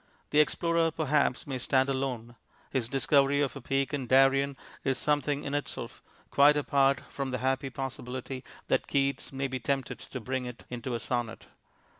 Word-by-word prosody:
The 150 Hz, -, +4 dB
explorer 165 Hz, +2 st, +3 dB
perhaps 150 Hz, -4 st, +1 dB
may 135 Hz, -3 st, -3 dB
stand 130 Hz, +2 st, +2 dB
alone. 130 Hz, -3 st, -2 dB, 0.4 s
His 125 Hz, -4 st, -1 dB
discovery 140 Hz, +1 st, +3 dB
of 140 Hz, -, 0 dB
a -, -, -7 dB
peak 135 Hz, +2 st, -1 dB
in 135 Hz, -3 st, -2 dB
Darien 135 Hz, +2 st, +4 dB, 0.3 s
is 135 Hz, -2 st, +1 dB
something 145 Hz, 0 st, 0 dB
in 140 Hz, -, -4 dB
itself, 145 Hz, 0 st, -3 dB, 0.3 s
quite 145 Hz, +1 st, +6 dB
apart 140 Hz, -1 st, +3 dB
from 140 Hz, -1 st, -3 dB
the 125 Hz, -, -1 dB
happy 130 Hz, +2 st, 0 dB
possibility 130 Hz, 0 st, -5 dB, 0.2 s
that -, -, +1 dB
Keats 140 Hz, -1 st, 0 dB
may 135 Hz, 0 st, -2 dB
be 130 Hz, -1 st, -4 dB
tempted 135 Hz, +2 st, -2 dB
to 130 Hz, -, -7 dB
bring 130 Hz, +2 st, -3 dB
it 125 Hz, -1 st, -9 dB
into 120 Hz, 0 st, -3 dB
a -, -, -2 dB
sonnet. 120 Hz, 0 st, -3 dB
135 Hz, 170 wpm, -29 LUFS, 130-140 Hz, 0.4 s, quite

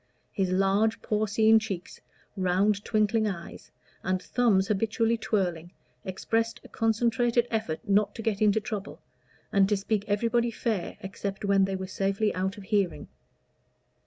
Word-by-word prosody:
His 190 Hz, -2 st, 0 dB
large 195 Hz, +4 st, +2 dB
porcine 215 Hz, +1 st, +3 dB
cheeks, 195 Hz, -5 st, -6 dB, 0.3 s
round 195 Hz, +2 st, +1 dB
twinkling 215 Hz, +1 st, +1 dB
eyes, 170 Hz, -4 st, -7 dB, 0.3 s
and 185 Hz, 0 st, 0 dB
thumbs 200 Hz, -3 st, +2 dB
habitually 225 Hz, +2 st, +1 dB
twirling, 180 Hz, -6 st, -2 dB, 0.3 s
expressed 225 Hz, +4 st, -1 dB
a -, -, -12 dB
concentrated 235 Hz, +1 st, +1 dB
effort 220 Hz, -2 st, -3 dB
not 205 Hz, +1 st, +2 dB
to 225 Hz, -, -6 dB
get 215 Hz, -2 st, -1 dB
into 215 Hz, 0 st, +4 dB
trouble, 210 Hz, -2 st, -6 dB, 0.5 s
and 195 Hz, -1 st, +4 dB
to 205 Hz, -, +2 dB
speak 200 Hz, +1 st, -1 dB
everybody 230 Hz, +3 st, +1 dB
fair 220 Hz, -5 st, -3 dB
except 195 Hz, +1 st, -5 dB
when 195 Hz, -1 st, +4 dB
they 195 Hz, 0 st, -2 dB
were 190 Hz, 0 st, -4 dB
safely 195 Hz, +2 st, 0 dB
out 190 Hz, +3 st, -2 dB
of 205 Hz, -, -9 dB
hearing. 195 Hz, -2 st, -1 dB
205 Hz, 140 wpm, -27 LUFS, 195-220 Hz, 0.5 s, into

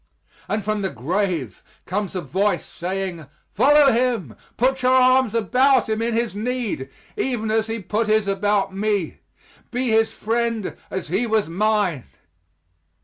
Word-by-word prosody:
And 210 Hz, -2 st, -2 dB
from 215 Hz, -1 st, -1 dB
the 190 Hz, -, -1 dB
grave 165 Hz, -, -2 dB, 0.2 s
comes 195 Hz, +1 st, -3 dB
a 185 Hz, -, -1 dB
voice, 200 Hz, +4 st, 0 dB
saying, 180 Hz, -3 st, -4 dB, 0.2 s
"Follow 290 Hz, 0 st, +5 dB
him! 230 Hz, -, 0 dB, 0.2 s
put 260 Hz, +2 st, +1 dB
your 255 Hz, +1 st, +4 dB
arms 255 Hz, -2 st, +4 dB
about 255 Hz, +3 st, +3 dB
him 220 Hz, 0 st, -1 dB
in 230 Hz, 0 st, 0 dB
his 230 Hz, -2 st, 0 dB
need, 220 Hz, -, -3 dB, 0.3 s
even 230 Hz, -4 st, -1 dB
as 220 Hz, 0 st, +1 dB
he 225 Hz, 0 st, -3 dB
put 215 Hz, +2 st, -2 dB
his 215 Hz, -1 st, +2 dB
about 195 Hz, 0 st, 0 dB
me. 205 Hz, -4 st, -1 dB, 0.5 s
Be 250 Hz, 0 st, -1 dB
his 220 Hz, 0 st, +3 dB
friend 230 Hz, -2 st, -2 dB
as 190 Hz, -4 st, -5 dB
he 200 Hz, +8 st, 0 dB
was 220 Hz, -2 st, +1 dB
mine." 195 Hz, -, 0 dB
215 Hz, 145 wpm, -22 LUFS, 195-235 Hz, 0.5 s, Follow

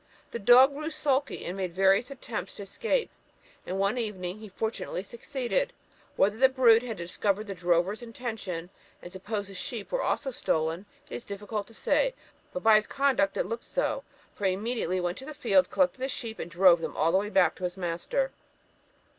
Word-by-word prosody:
The 235 Hz, -, -4 dB
dog 250 Hz, +6 st, +7 dB
grew 305 Hz, +3 st, -4 dB
sulky, 290 Hz, -3 st, -1 dB
and 180 Hz, -, -4 dB
made 185 Hz, -3 st, -3 dB
various 195 Hz, +5 st, +4 dB
attempts 255 Hz, -4 st, -6 dB
to 200 Hz, -, -7 dB
escape, 455 Hz, -, -1 dB, 0.6 s
and 185 Hz, -, -2 dB
one 200 Hz, +5 st, +1 dB
evening 195 Hz, -4 st, -4 dB
he 215 Hz, -1 st, -10 dB
fortunately 220 Hz, -2 st, -3 dB
succeeded. 255 Hz, -, -2 dB, 0.4 s
Whether 205 Hz, +2 st, +3 dB
the 265 Hz, +2 st, +6 dB
brute 240 Hz, -4 st, +6 dB
had 235 Hz, -4 st, -5 dB
discovered 195 Hz, +4 st, -1 dB
the 200 Hz, -, -5 dB
drover's 180 Hz, +4 st, +1 dB
intention, 220 Hz, -8 st, -5 dB, 0.3 s
and 175 Hz, -, -9 dB
supposed 200 Hz, +1 st, -4 dB
the -, -, -10 dB
sheep 210 Hz, +3 st, -5 dB
were -, -, 0 dB
also 270 Hz, -, -1 dB
stolen, 165 Hz, -3 st, -1 dB, 0.2 s
it -, -, -11 dB
is 245 Hz, -, -10 dB
difficult 205 Hz, +1 st, -5 dB
to 230 Hz, -, -14 dB
say; -, -, +1 dB, 0.4 s
but 275 Hz, -, -5 dB
by 220 Hz, -1 st, +7 dB
his 215 Hz, -, -1 dB
conduct 270 Hz, -8 st, +1 dB
it -, -, +1 dB
looked 230 Hz, +1 st, -4 dB
so, -, -, -1 dB, 0.3 s
for 200 Hz, -, -1 dB
he 185 Hz, -, +2 dB
immediately 200 Hz, -3 st, -1 dB
went 175 Hz, +1 st, -2 dB
to 265 Hz, -, -9 dB
the 305 Hz, +1 st, -8 dB
field, 275 Hz, +2 st, +3 dB
collected 275 Hz, -2 st, +2 dB
the 265 Hz, +1 st, -2 dB
sheep, 230 Hz, -4 st, -5 dB
and 170 Hz, -, -5 dB
drove 175 Hz, 0 st, +5 dB
them -, -, -5 dB
all 190 Hz, +7 st, +2 dB
back 180 Hz, -6 st, +4 dB
to -, -, -10 dB
his 180 Hz, +1 st, -2 dB
master." 190 Hz, -, -1 dB
215 Hz, 190 wpm, -28 LUFS, 185-255 Hz, 0.6 s, dog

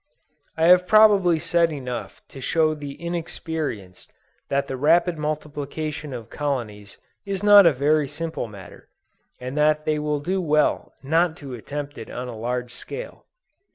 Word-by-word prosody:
I 160 Hz, -, +2 dB
have 180 Hz, +1 st, +6 dB
probably 205 Hz, -6 st, +5 dB
said 170 Hz, 0 st, +1 dB
enough 125 Hz, -5 st, -6 dB
to 135 Hz, -, -11 dB
show 155 Hz, +3 st, +2 dB
the 145 Hz, -2 st, -8 dB
inexperienced 160 Hz, -, -5 dB, 0.4 s
that 140 Hz, 0 st, +1 dB
the 135 Hz, -, -5 dB
rapid 170 Hz, +6 st, +3 dB
multiplication 150 Hz, 0 st, -4 dB
of 120 Hz, -4 st, -7 dB
colonies 115 Hz, -9 st, -4 dB, 0.3 s
is 195 Hz, -1 st, -4 dB
not 205 Hz, -3 st, +8 dB
a -, -, +6 dB
very 145 Hz, +2 st, +1 dB
simple 160 Hz, -2 st, -4 dB
matter, 100 Hz, -3 st, -13 dB, 0.5 s
and 125 Hz, +2 st, -6 dB
that 150 Hz, 0 st, +2 dB
they 155 Hz, -1 st, 0 dB
will 150 Hz, -1 st, -1 dB
do 185 Hz, +6 st, -1 dB
well 155 Hz, -3 st, +1 dB
not 165 Hz, +3 st, +1 dB
to 140 Hz, -5 st, -9 dB
attempt 145 Hz, +3 st, -6 dB
it 115 Hz, -, -9 dB
on 125 Hz, +1 st, -5 dB
a 120 Hz, -, -7 dB
large 125 Hz, +2 st, -3 dB
scale. -, -, -8 dB
150 Hz, 155 wpm, -23 LUFS, 130-165 Hz, 0.5 s, not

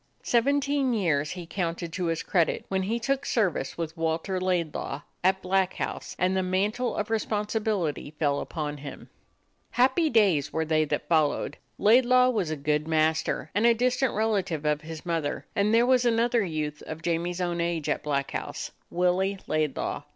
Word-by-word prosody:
Seventeen 275 Hz, +1 st, +2 dB
years 155 Hz, -8 st, +1 dB
he 180 Hz, +1 st, -6 dB
counted 170 Hz, -1 st, -3 dB
to 180 Hz, 0 st, -2 dB
his 165 Hz, -1 st, -1 dB
credit 170 Hz, -4 st, +1 dB
when 190 Hz, -1 st, 0 dB
he 220 Hz, +5 st, -1 dB
took 275 Hz, +3 st, 0 dB
service 185 Hz, -, 0 dB
with 165 Hz, -1 st, -4 dB
Walter 165 Hz, +3 st, -1 dB
Laidlaw 170 Hz, -6 st, -1 dB, 0.2 s
at 190 Hz, +1 st, +2 dB
Black 190 Hz, 0 st, +1 dB
House -, -, -4 dB
and 185 Hz, +1 st, +1 dB
the 190 Hz, -, +2 dB
man 185 Hz, +3 st, +1 dB
tle 245 Hz, +2 st, -2 dB
of 210 Hz, +1 st, -3 dB
responsibility 210 Hz, -7 st, -1 dB
fell 145 Hz, -2 st, +1 dB
upon 150 Hz, -2 st, -4 dB
him. 140 Hz, -1 st, -9 dB, 0.6 s
Happy 265 Hz, +6 st, +3 dB
days 190 Hz, -, +3 dB
were 160 Hz, 0 st, -1 dB
they 155 Hz, 0 st, +2 dB
that -, -, -3 dB
followed. 155 Hz, -3 st, +1 dB, 0.2 s
Laidlaw 250 Hz, +3 st, +5 dB
was 200 Hz, -9 st, -1 dB
a 155 Hz, -, -1 dB
good 150 Hz, +1 st, -1 dB
master 160 Hz, 0 st, +1 dB
and 215 Hz, +4 st, +3 dB
a 235 Hz, -, +5 dB
distant 250 Hz, +2 st, +1 dB
rela 215 Hz, -2 st, +1 dB
tive 155 Hz, -4 st, -5 dB
of 150 Hz, 0 st, +1 dB
his 160 Hz, 0 st, -8 dB
mother, 165 Hz, -4 st, -2 dB
and 205 Hz, +1 st, +2 dB
there 230 Hz, +2 st, +5 dB
was 250 Hz, -1 st, +4 dB
another 235 Hz, -1 st, +2 dB
youth 155 Hz, -4 st, -3 dB
of 155 Hz, +1 st, -7 dB
Jamie's 175 Hz, +1 st, -1 dB
own 175 Hz, -1 st, -1 dB
age 170 Hz, -3 st, -1 dB
at 150 Hz, -, 0 dB
Black 140 Hz, -2 st, -1 dB
House -, -, -5 dB
— -, -, -42 dB
Willie 180 Hz, +3 st, +1 dB
Laidlaw. 155 Hz, -3 st, -1 dB
180 Hz, 180 wpm, -27 LUFS, 155-220 Hz, 0.6 s, Laidlaw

